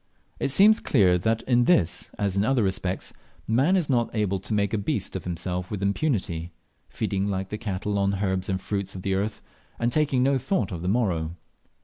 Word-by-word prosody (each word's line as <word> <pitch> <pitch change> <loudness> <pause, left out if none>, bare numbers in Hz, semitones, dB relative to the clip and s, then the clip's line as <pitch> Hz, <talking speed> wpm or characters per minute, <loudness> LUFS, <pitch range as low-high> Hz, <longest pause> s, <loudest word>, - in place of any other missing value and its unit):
It - - 0
seems 205 +10 +6
clear 90 -8 +3
that 110 +4 0
in 120 -1 +3
this, 105 - +2
as 100 -2 -1
in 100 - +2
other 125 0 +2
respects, 95 -1 -2 0.3
man 135 +12 +3
is 175 -6 +1
not 120 -4 +1
able 100 -3 0
to 95 - -4
make 100 +1 0
a 110 - +1
beast 100 - -2
of - - -5
himself 90 +1 -3
with 100 -2 -4
impunity, 95 - -1 0.4
feeding 100 0 -2
like 95 -1 -2
the 105 - -4
cattle 100 -1 -2
on 100 0 +2
the 100 +1 -1
herbs 95 0 -1
and 95 -1 0
fruits 100 0 -3
of 90 - -7
the 95 - 0
earth, 100 +3 -2 0.3
and 120 +1 0
taking 140 -3 +2
no 135 0 +2
thought 155 - -1
of 85 -3 -5
the 90 - -3
morrow. 90 -7 0
100 Hz, 210 wpm, -25 LUFS, 95-120 Hz, 0.4 s, seems